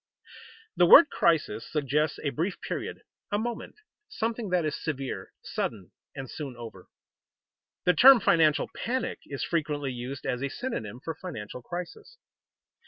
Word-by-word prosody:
_ - - -18 0.4
The 175 0 +6
word 315 - +9
crisis 155 -10 +1
suggests 150 +1 0
a 145 - 0
brief 175 +6 -2
period, - - -5 0.3
a 205 - +2
moment, 235 +1 -4 0.3
something 225 -1 -3
that 180 -3 +1
is 150 - -1
severe, 135 -4 -4
sudden, 100 -5 -4 0.2
and 135 -2 -6
soon 135 -2 -7
over. 115 -6 -10 1.0
The 180 - +5
term 265 +3 +9
financial 160 -6 +3
panic 255 +3 -2
is 140 - -4
frequently 150 -4 -1
used 125 +3 -6
as 125 - -1
a 140 - -1
synonym 125 - -5
for 165 - -4
financial 125 - -7
crisis. 420 - -8
155 Hz, 145 wpm, -28 LUFS, 135-185 Hz, 1.0 s, word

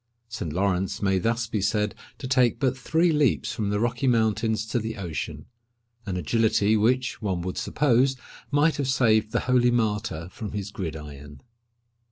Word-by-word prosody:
Saint 85 -9 -4
Lawrence 95 +2 0
may 95 -1 +2
thus 115 +4 0
be 115 -3 -2
said 105 +1 0 0.2
to 130 - -6
take 125 -3 +3
but 130 -1 +1
three 165 +6 +1
leaps 150 -5 +1
from 105 -2 -2
the 105 0 0
Rocky 120 +3 0
Mountains 110 -2 +1
to 115 +2 -1
the 110 0 -5
ocean—an 115 +4 -7
agility 110 +3 +2
which, 125 +5 +1
one 95 -5 -1
would 90 0 -3
suppose, 135 -1 +2 0.3
might 145 +2 +2
have 140 -2 -1
saved 110 -5 +2
the - - 0
holy 125 -1 +3
martyr 105 -8 -1
from 105 +1 -7
his 100 -1 -4
gridiron. 75 -5 -7
110 Hz, 160 wpm, -25 LUFS, 100-125 Hz, 0.3 s, take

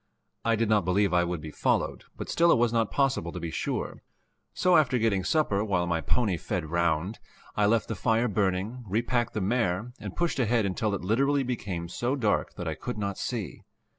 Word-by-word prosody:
I 115 0 +2
did 115 +1 +1
not 105 -2 +3
believe 95 +2 +2
I 90 0 +4
would 85 -2 -3
be 75 0 -7
followed, - - 0
but - - -5
still 170 0 +4
it - - +5
was 120 0 +2
not 115 -2 +2
possible 135 -12 0
to - - -6
be 85 - -4
sure, - - -3 0.5
so, 180 -1 +3
after 135 -5 +4
getting 110 -5 +1
supper, 105 - +1
while 95 -5 0
my 85 -1 0
pony 105 -5 +1
fed 80 -1 -4
round, 85 +4 0 0.4
I 105 -1 +3
left 115 +1 +2
the - - -2
fire 115 +3 +1
burning, 100 +3 -1
repacked 120 +4 0
the 105 - 0
mare 110 +1 0
and - - -7
pushed 170 -5 0
ahead 115 -3 +2
until 100 +2 0
it 100 - -6
literally 135 +8 +2
became 100 -9 -3
so 120 +9 -1
dark 110 -7 0
that 90 -3 -5
I 80 - -1
could 125 +9 -5
not 100 -2 -3
see. 110 - -4
105 Hz, 205 wpm, -28 LUFS, 90-120 Hz, 0.5 s, it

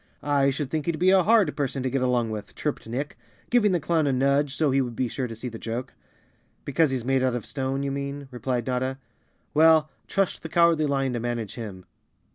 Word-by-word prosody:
"I 140 -1 +3
should 140 0 -3
think 155 -1 -2
he'd 170 -2 0
be 185 +3 +4
a 190 -1 +6
hard 215 +2 +3
person 135 -2 -2
to 130 - 0
get 135 0 0
along 125 -3 +1
with," 105 -2 -7
chirped 150 -6 -3
Nick, 135 +6 -4 0.3
giving 230 -4 +4
the 175 - +2
clown 160 -1 +1
a - - +2
nudge 140 +2 +2
so 155 -3 +2
he 135 +1 +3
would 120 -3 -4
be 130 - 0
sure 125 +2 -3
to 115 - -7
see 115 +3 -6
the 115 -2 -7
joke. 120 +2 -5 0.7
"Because 155 +2 +2
he's 130 -3 -3
made 135 0 +2
of 125 -4 0
stone, 135 0 -2
you 140 - -1
mean?" 140 0 -4
replied 125 -1 -2
Notta. 130 +1 -1 0.6
"Well, 155 -1 +5 0.2
trust 195 -2 0
the 160 - -7
Cowardly 170 -2 +4
Lion 135 -2 0
to 120 - -2
manage 115 -3 -3
him. 100 -6 -8
135 Hz, 220 wpm, -25 LUFS, 125-155 Hz, 0.7 s, a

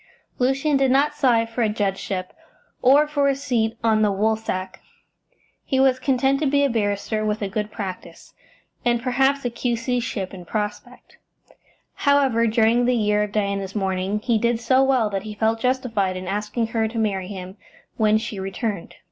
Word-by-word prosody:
Lucian 270 +3 +2
did 270 -1 +2
not 280 +3 +3
sigh 250 -6 +2
for 230 +2 -4
a 220 - +2
judgeship, 195 -3 -3 0.5
or 275 +4 +6
for 290 -2 +1
a 275 - +1
seat 240 -5 -1
on 220 -1 +3
the 210 -1 +3
Woolsack; 200 -2 -2 0.8
he 265 - 0
was 265 -1 +4
content 270 0 +1
to 300 - +1
be 285 +1 +2
a 280 - +2
barrister 215 0 -1
with 215 0 -1
a - - -1
good 210 +1 -3
practice, 190 -4 -8 0.5
and 240 -1 +1
perhaps 270 +2 +1
a 245 - 0
Q.C. 240 +1 -1
ship 200 -5 -4
in 180 -2 -9
prospect. 210 +3 -5 0.8
However, 270 -5 +2
during 225 +2 +3
the 250 0 +2
year 210 -2 +2
of 210 -1 -2
Diana's 200 -2 -2
mourning 190 0 -1
he 225 0 +1
did 235 +1 +1
so 260 +3 +3
well 260 -5 +2
that 195 -1 -2
he 215 +1 -8
felt 220 +1 +1
justified 230 -7 0
in 185 0 -7
asking 210 +4 -2
her 225 -1 +1
to 225 +1 -7
marry 195 -4 -1
him 190 0 -8 0.4
when 215 -1 +3
she 220 -2 -5
returned. 195 0 -4
225 Hz, 175 wpm, -22 LUFS, 205-255 Hz, 0.8 s, or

